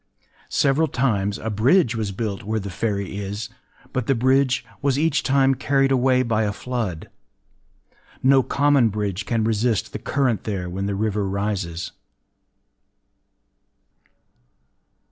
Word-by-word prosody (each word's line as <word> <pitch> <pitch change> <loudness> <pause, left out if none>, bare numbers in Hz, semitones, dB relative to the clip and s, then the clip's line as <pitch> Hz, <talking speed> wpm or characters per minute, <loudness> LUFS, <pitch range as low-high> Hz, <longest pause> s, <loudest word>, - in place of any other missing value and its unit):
Several 145 +3 +2
times 105 -8 0
a 110 - -4
bridge 120 - +3
was 110 -3 -2
built 100 -1 -3
where 110 +2 -2
the 100 -1 -6
ferry 100 -1 -2
is; 100 +1 -5 0.4
but 130 -3 -2
the 135 - +3
bridge 130 +2 +2 0.2
was 140 -1 +1
each 150 -1 +2
time 135 0 +3
carried 135 +1 +1
away 130 0 +3
by 115 -3 0
a 105 -1 0
flood. 110 -7 -4 1.2
No 135 0 +6
common 140 -3 +3
bridge 100 -2 -3
can 115 -2 0
resist 110 -1 0
the - - -4
current 130 -6 0
there 95 -4 -3
when 95 +2 -3
the 100 - -1
river 105 -1 -1
rises. 95 -4 -3
110 Hz, 130 wpm, -23 LUFS, 100-135 Hz, 1.2 s, No